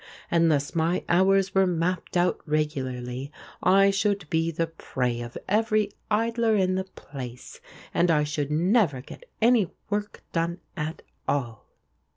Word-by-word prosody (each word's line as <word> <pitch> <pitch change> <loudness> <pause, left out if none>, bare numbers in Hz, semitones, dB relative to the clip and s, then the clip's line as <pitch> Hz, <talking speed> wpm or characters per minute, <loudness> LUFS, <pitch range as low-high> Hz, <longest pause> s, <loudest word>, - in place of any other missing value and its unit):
Unless 160 -4 +2
my 165 +2 +1
hours 190 +2 +3
were 195 -1 +4
mapped 180 +1 -1
out 175 +1 +2
regularly 135 -3 -2 0.3
I 195 +2 +5
should 200 -3 0
be 165 0 +2
the 165 0 0
prey 125 -7 -3
of 120 0 -7
every 215 0 +2 0.2
idler 230 +1 +2
in 185 -2 +2
the 190 0 -1
place 130 -9 -9 0.3
and 175 - +3
I 150 -2 +4
should 150 -1 -2
never 165 - +2
get - - -13
any 230 -5 +5 0.2
work 205 0 -3
done 170 +1 -1 0.2
at 155 -1 -4 0.2
all." 120 -7 -2
170 Hz, 140 wpm, -26 LUFS, 150-195 Hz, 0.3 s, I